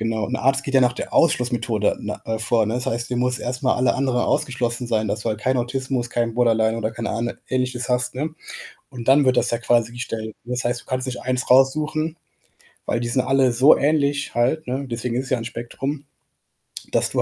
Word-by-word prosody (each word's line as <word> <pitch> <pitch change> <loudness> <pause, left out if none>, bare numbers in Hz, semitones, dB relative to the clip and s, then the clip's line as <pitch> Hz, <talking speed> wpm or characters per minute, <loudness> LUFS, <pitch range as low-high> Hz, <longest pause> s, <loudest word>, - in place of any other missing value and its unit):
Genau. 110 -1 -1
Und 125 - -6
der - - -2
Arzt 135 +2 +2
geht 135 -1 -4
ja 135 - +6
nach 125 -1 +4
der - - -6
Ausschlussmethode 120 -9 +2
ne 105 0 -5
äh, 110 0 -2
vor, 115 -1 +2
ne? 110 - -2
Das 125 0 -2
heißt, 120 +1 -2
du 125 - -1
muss 125 +1 +1
erst 125 0 -4
mal 130 - +3
alle 125 -1 +2
anderen 130 -2 0
ausgeschlossen 120 -1 -1
sein, 110 -2 0
dass 110 +2 -2
du - - -2
halt 110 0 -2
kein 130 +4 +1
Autismus, 125 0 -2
kein 115 -1 -1
Borderline 115 -2 +2
oder 110 -1 -1
kein 115 +1 -5
Ahn 120 +1 -2 0.2
Ähnliches 125 -1 -1
hast, 125 0 0
ne? 155 +4 -3 0.5
Und 125 -3 -8
dann 140 +2 +6
wird 130 -1 +3
das - - +3
ja 120 - 0
quasi 120 -1 +1
gestellt. 110 -3 -5
Das 125 +1 -3
heißt, 120 +1 -1
du - - -24
kannst 130 0 -2
nicht 130 -1 -4
1 125 0 -1
raussuchen, 155 +5 +3 0.7
weil 120 - 0
die 120 - -2
sind 130 +2 +2
alle 130 0 +3
so 130 +5 +6
ähnlich 145 -2 0
halt, 130 +6 +1
ne? 130 +3 -2
Deswegen 120 0 -3
ist 130 +2 -1
es - - -8
ja 130 - +2
'n 115 - -6
Spektrum, 135 +5 -5 0.9
dass - - +2
du - - +1
125 Hz, 230 wpm, -22 LUFS, 115-130 Hz, 0.9 s, ja